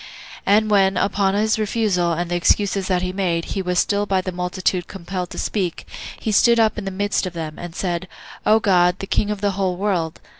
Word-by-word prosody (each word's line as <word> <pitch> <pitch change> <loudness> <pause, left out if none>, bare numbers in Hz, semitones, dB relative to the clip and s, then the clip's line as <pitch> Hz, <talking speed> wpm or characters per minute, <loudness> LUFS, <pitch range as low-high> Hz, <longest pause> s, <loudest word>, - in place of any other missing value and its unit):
And 215 +1 +3
when, 195 -1 +3
upon 200 -1 +1
his 215 +1 +1
refusal, 205 -5 +1
and 170 +1 -2
the - - +1
excuses 195 +2 +1
that 185 -1 +1
he 185 0 -2
made, 175 -4 -1
he 195 - -1
was 180 -1 -2
still 205 +2 +1
by 190 -1 +2
the 185 0 -3
multitude 180 0 -1
compelled 180 -1 -5
to - - -9
speak, 185 -6 -2 0.3
he 220 - -2
stood 235 +3 +4
up 220 -1 +2
in 205 - -6
the - - -2
midst 200 0 -1
of 180 - -7
them, 160 -2 -6
and 175 -1 -8
said, 180 -1 -2 0.4
"O 220 +1 +4
God, 180 -3 +3
the 195 - -5
King 205 +1 0
of 210 -2 -3
the 205 -1 +1
whole 190 -2 -1
world! 180 -5 -1
190 Hz, 220 wpm, -21 LUFS, 180-205 Hz, 0.4 s, stood